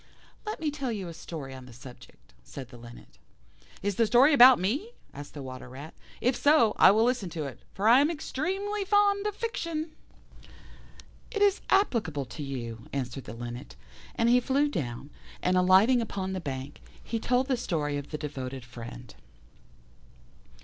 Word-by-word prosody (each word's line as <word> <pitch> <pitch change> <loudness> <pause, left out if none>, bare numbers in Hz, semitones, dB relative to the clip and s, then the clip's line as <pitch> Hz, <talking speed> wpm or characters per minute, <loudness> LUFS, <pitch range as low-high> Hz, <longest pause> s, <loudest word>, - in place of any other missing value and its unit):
"Let 425 - -3
me 310 -2 -1
tell 275 -4 -3
you 195 -5 -4
a - - -8
story 160 -5 -7
on 130 -1 -10
the 120 - -12
subject," 120 - -14
said 130 - -9
the 125 - -12
Linnet. 120 0 -14 0.6
"Is 205 -1 -1
the 230 - +3
story 260 +7 +6
about 255 -2 +9
me?" 280 - -2 0.2
asked 145 +1 -10
the 145 - -6
Water 130 -1 -8
rat. 140 +5 -9 0.3
"If 250 +1 +2
so, 285 -8 +4
I - - +8
will 215 +3 +4
listen 240 -6 0
to 160 -1 -4
it, 140 -3 -7 0.2
for 200 +3 0
I 245 +4 +7
am 295 - +3
extremely 380 +7 -2
fond 405 +1 +3
of 420 - -3
fiction." 335 -9 -3 1.4
"It 410 - 0
is 400 -1 +3
applicable 195 - +1
to 150 - -9
you," 120 -5 -6
answered 130 -1 -4
the 110 - -8
Linnet; 120 +2 -7 0.4
and 230 - +2
he 245 +1 +6
flew 275 +4 +1
down, 140 - -4 0.3
and 180 - +1
alighting 190 +7 +5
upon 190 -4 -4
the 185 - -3
bank, 135 -1 -6 0.2
he 230 - -3
told 250 +3 +1
the 270 - +2
story 155 -11 -2
of 145 0 -5
The 150 - -4
Devoted 135 -4 -6
Friend. 120 0 -10
185 Hz, 175 wpm, -28 LUFS, -, 1.4 s, about